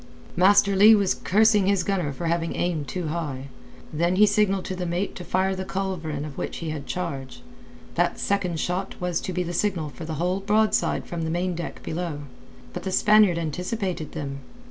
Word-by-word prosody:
Master 200 +2 +5
Leigh 210 +3 +8
was 200 -3 +2
cursing 210 0 +3
his 200 -3 +2
gunner 180 -6 -1
for 140 +5 -6
having 165 0 0
aimed 160 -5 -1
too 175 -1 -3
high. 145 -5 -4 0.4
Then 170 +4 +1
he 210 +3 +7
signalled 200 -2 +2
to 185 - -4
the 180 -1 -3
mate 175 +4 -2
to 180 - -7
fire 190 +2 0
the 190 - -4
culverin 185 -6 -3
of 145 -3 -8
which - - -4
he 165 -2 -4
had 145 -3 -6
charge. 135 - -5 0.5
That - - +1
second 185 -5 0
shot 180 +4 -2
was 180 -2 -1
to - - -4
be 180 0 -1
the 175 0 -5
signal 175 -5 0
for 160 +3 -9
the 160 0 -4
whole 180 +5 0
broadside 210 +2 +1
from 170 -1 -5
the 160 - -2
main 175 +2 -1
deck 170 0 -6
below. 160 -3 -4 0.5
But 180 - -5
the 190 - -4
Spaniard 210 -3 +5
anticipated 180 +1 -3
them. 140 -3 -5
180 Hz, 195 wpm, -25 LUFS, 160-195 Hz, 0.5 s, Leigh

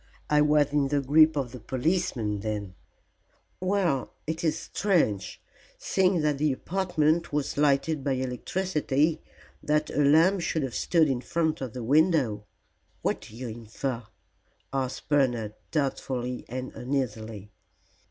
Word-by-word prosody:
I 150 0 +5
was 150 -1 +3
in 145 -2 +3
the 145 +1 +1
grip 155 +3 +5
of 135 -4 -2
the 125 - -8
policeman 130 - -1
then," 105 0 -2
said - - -37 0.3
Gore. 185 - -1
"Well, 180 -9 +1
it 160 +2 -3
is 160 -2 +1
strange, 135 - 0 0.4
seeing 185 -3 +2
that 150 -2 0
the 150 0 +2
apartment 170 +1 0
was 145 -1 -1
lighted 145 0 +2
by 140 -1 +1
electricity, 150 +3 0 0.4
that 150 0 0
a 145 - +2
lamp 165 +7 +5
should 160 -2 -1
have 130 -3 -3
stood 165 -3 +3
in 130 -3 -1
front 160 +1 -1
of 130 -5 -4
the 125 - -5
window." 135 - +2 0.6
"What - - 0
do 110 - -12
you 125 +1 -6
infer?" 115 +3 -4 0.7
asked 130 -2 -3
Bernard, 120 -7 +1 0.2
doubtfully 130 -4 -2
and 130 +1 -5
uneasily. 115 -6 -4
140 Hz, 140 wpm, -27 LUFS, 125-160 Hz, 0.7 s, I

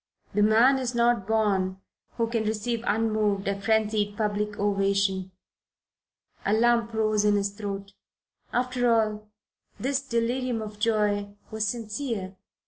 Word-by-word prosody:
The 210 - +2
man 230 +6 +5
is 250 -2 -3
not 235 -4 +2
born 200 -4 +1 0.4
who 230 - +2
can 230 -1 -1
receive 225 +2 -2
unmoved 215 -2 +1
a 200 0 -1
frenzied 210 -1 +1
public 210 -1 -1
ovation. 195 -2 +1 1.1
A 200 - +1
lump 235 0 +3
rose 215 -1 +2
in 210 0 +4
his 200 0 0
throat. 200 -1 -6 0.6
After 245 -1 +1
all, 215 -2 0 0.5
this 270 +1 0
delirium 245 -1 -1
of 210 -1 -7
joy 210 -2 +1 0.2
was 220 -1 -1
sincere. 215 -3 -4
215 Hz, 130 wpm, -26 LUFS, 205-230 Hz, 1.1 s, man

